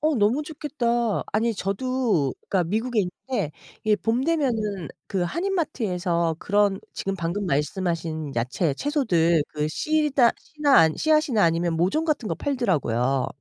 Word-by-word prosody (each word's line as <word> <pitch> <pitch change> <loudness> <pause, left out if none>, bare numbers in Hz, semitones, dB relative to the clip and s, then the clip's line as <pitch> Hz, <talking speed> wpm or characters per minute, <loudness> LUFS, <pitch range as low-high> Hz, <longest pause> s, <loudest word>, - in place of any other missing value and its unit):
어 305 +1 +2
너무 230 +6 +2
좋겠다. 240 -7 -1
아니 225 +2 +1
저도 200 - 0
그러니까 185 -3 +1
미국에 225 +3 0
있는데 180 - -3 0.3
이 215 -1 +4
봄 235 +5 0
되면은 225 - 0 0.2
그 190 -2 -1
한인마트에서 185 - -1
그런 205 -1 +1
지금 195 - -2
방금 185 +2 -2
말씀하신 160 0 -2
야채 135 +7 0
채소들 175 - +2
그 150 0 -2
씨다 290 - +2
씨나 295 - +3
아 160 - +5
씨앗이나 305 -8 +2
아니면 165 0 +1
모종 185 - +1
같은 300 -7 -1
거 - - -1
팔더라고요. 140 - 0
205 Hz, 315 characters per minute, -24 LUFS, 170-265 Hz, 0.3 s, 아